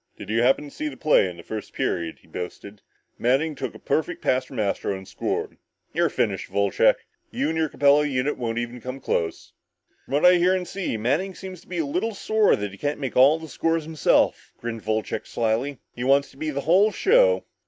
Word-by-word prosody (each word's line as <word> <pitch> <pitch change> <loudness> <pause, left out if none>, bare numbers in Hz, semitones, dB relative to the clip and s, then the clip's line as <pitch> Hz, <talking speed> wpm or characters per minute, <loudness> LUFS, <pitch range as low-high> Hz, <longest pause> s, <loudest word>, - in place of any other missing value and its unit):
"Did - - -7
you 115 +1 +2
happen 130 +4 +3
to 145 - -10
see 305 - -4
the 300 - -7
play 150 -10 +3
in 90 - -10
the 85 - -11
first 110 -1 -7
period?" 85 -1 -2
he - - -22
boasted. 100 +3 -7 0.4
"Manning 135 +6 +2
took 130 -4 -5
a - - -8
perfect 160 +3 -1
pass 130 0 +2
from 130 -3 -8
Astro 100 -1 -1
and 95 0 -11
scored. - - -3 0.4
You're - - +2
finished, - - -1
Wolcheck, 100 -1 +3 0.3
you 145 - -1
and 160 - -2
your 160 -1 +1
Capella 145 +1 +4
unit 135 +1 0
won't 115 -2 -3
even 120 +1 -4
come 130 +3 -6
close." 85 -9 -2 0.5
"From - - -9
what 145 - +3
I 180 0 +8
hear 180 +2 +3
and 180 -1 -3
see, 190 - -3
Manning 165 - 0
seems 185 -1 -9
to - - -23
be 180 - -5
a 160 - 0
little 200 +10 -2
sore 215 +1 +3
that 105 -1 -4
he 100 - -13
can't 145 0 -2
make 135 -4 -4
all 140 +5 +6
the 160 0 -9
scores 165 +1 0
himself," 155 -1 +1
grinned 115 -2 -5
Wolcheck 110 0 -2
slyly. 120 +5 -1 0.2
"He 120 - -4
wants 140 +2 +3
to 135 - -20
be 155 +2 -3
the 140 -1 -2
whole 190 +8 +4
show!" - - +4
140 Hz, 220 wpm, -24 LUFS, 115-165 Hz, 0.5 s, I